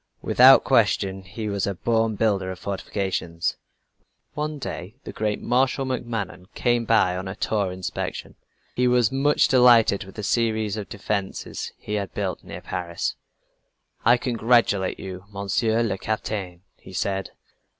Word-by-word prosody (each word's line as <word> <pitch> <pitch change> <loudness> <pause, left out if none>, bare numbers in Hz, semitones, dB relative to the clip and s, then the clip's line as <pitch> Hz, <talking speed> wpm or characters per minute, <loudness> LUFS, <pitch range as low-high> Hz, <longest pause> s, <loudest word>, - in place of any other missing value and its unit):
Without - - +7
question 95 -1 +2
he 105 +4 -6
was 100 -1 -1
a 100 - -2
born 115 +3 +1
builder 100 -3 +1
of 95 - -5
fortifications. 95 -3 -3 0.8
One 150 0 -3
day 110 -6 -6
the - - -8
great 105 -1 -1
Marshal 130 +2 +1
MacMahon 115 -8 -4
came 120 -1 +1
by 110 -5 +3
on 95 +1 -4
a 95 - -5
tour 105 -3 0
of 90 - -4
inspection, 95 0 -5 0.4
and 125 0 +3
was 125 -3 +3
much 140 +2 +3
delighted 120 -5 +5
with 95 - -14
a 105 - -4
series 110 -1 0
of 105 -2 -6
defenses 100 -1 -4
he 105 - -7
had 100 -4 -3
built - - -3
near - - -8
Paris. 85 -2 -3 0.9
"I 120 +2 +6
congratulate 115 -5 +2
you, 95 0 -7
Monsieur 105 +3 0
le 95 -4 -2
Capitaine!" 95 -5 -4
he 95 - -14
said. 95 +2 -2
105 Hz, 150 wpm, -24 LUFS, 95-115 Hz, 0.9 s, Without